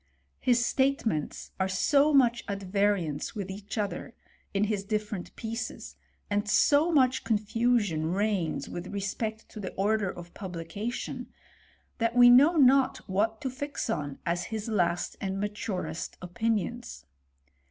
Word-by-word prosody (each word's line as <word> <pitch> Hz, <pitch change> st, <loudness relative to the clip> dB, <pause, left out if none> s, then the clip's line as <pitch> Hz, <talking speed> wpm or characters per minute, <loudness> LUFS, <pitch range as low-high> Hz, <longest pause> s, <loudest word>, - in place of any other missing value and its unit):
His 240 Hz, -1 st, +3 dB
statements 250 Hz, -, 0 dB
are 190 Hz, -, +2 dB
so 280 Hz, +11 st, +3 dB
much 240 Hz, -4 st, +4 dB
at 200 Hz, -1 st, -4 dB
variance 190 Hz, -6 st, 0 dB
with 195 Hz, -2 st, -4 dB
each 200 Hz, +3 st, -7 dB
other, 205 Hz, -2 st, -3 dB, 0.4 s
in 200 Hz, +1 st, +1 dB
his 210 Hz, -2 st, 0 dB
different 210 Hz, -2 st, -3 dB
pieces, 225 Hz, 0 st, -5 dB, 0.3 s
and 205 Hz, 0 st, -1 dB
so 295 Hz, +10 st, +4 dB
much 260 Hz, -4 st, +3 dB
confusion 215 Hz, -6 st, +1 dB
reigns 200 Hz, -3 st, 0 dB
with 175 Hz, +1 st, -6 dB
respect 215 Hz, +3 st, -3 dB
to 215 Hz, -, -9 dB
the 190 Hz, -3 st, -5 dB
order 205 Hz, 0 st, +1 dB
of 175 Hz, -1 st, -9 dB
publication, 190 Hz, +5 st, -5 dB, 0.7 s
that 230 Hz, 0 st, +1 dB
we 245 Hz, 0 st, +8 dB
know 285 Hz, +8 st, +7 dB
not 270 Hz, -2 st, +4 dB
what 215 Hz, +4 st, 0 dB
to 265 Hz, -, -2 dB
fix 285 Hz, +3 st, -3 dB
on 145 Hz, -4 st, -3 dB
as 175 Hz, 0 st, -1 dB
his 220 Hz, -1 st, -4 dB
last 175 Hz, -5 st, 0 dB
and 195 Hz, 0 st, -2 dB
maturest 200 Hz, -6 st, -4 dB
opinions. 220 Hz, -, -2 dB
210 Hz, 135 wpm, -28 LUFS, 190-240 Hz, 0.7 s, we